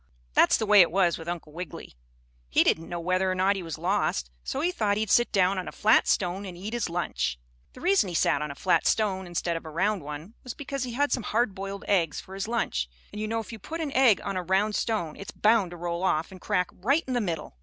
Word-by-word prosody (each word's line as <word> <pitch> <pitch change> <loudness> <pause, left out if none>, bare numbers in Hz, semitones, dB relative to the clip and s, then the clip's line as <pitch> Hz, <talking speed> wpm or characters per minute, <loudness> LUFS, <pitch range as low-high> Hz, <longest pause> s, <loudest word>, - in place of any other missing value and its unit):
That's - - +5
the 220 - -1
way 210 -1 +7
it 175 - +5
was 175 -1 +2
with 165 - -9
Uncle 170 -3 -5
Wiggily, 170 -2 -8 0.6
he - - +4
didn't 165 +1 +1
know 175 - -3
whether 185 +2 +1
or - - -1
not 190 +2 +2
he 195 - -4
was 165 -2 -6
lost, 160 - 0
so - - -3
he 350 +3 +1
thought 210 - 0
he'd 215 -2 -1
sit 240 - +4
down 190 -1 +2
on 180 - -5
a - - -5
flat 220 +2 +4
stone 185 +1 0
and 185 -3 -8
eat 205 +5 -6
his 235 -6 -1
lunch. 65 - -2 0.4
The - - -13
reason 370 - +3
he 175 - -5
sat 145 - +2
on 150 - -3
a 140 - -6
flat 180 +5 +2
stone 190 -4 +1
instead 175 0 -2
of 165 - -5
a 160 - -8
round 190 +5 0
one 150 +7 -8
was 250 - -7
because 275 -2 -4
he 245 - -6
had 285 +4 +1
some 250 - +1
hard 225 0 0
boiled 195 +1 -6
eggs 170 -7 +1
for 190 - -11
his 195 +1 -4
lunch, 140 - -1 0.2
and 210 - -6
you 215 - -2
know 225 +1 -1
if 220 - -10
you 225 - -8
put 325 - -6
an 310 -3 -2
egg 255 -7 +5
on 195 - -3
a 185 - -1
round 190 +4 +1
stone 205 -9 -1
it's 200 - -8
bound 215 -3 +3
to 175 - -9
roll 170 0 -3
off 165 -3 0
and 185 -1 -12
crack 180 -4 0
right 275 - +1
in 260 - -3
the 245 - +1
middle. 165 - -4
190 Hz, 265 wpm, -27 LUFS, 170-220 Hz, 0.6 s, way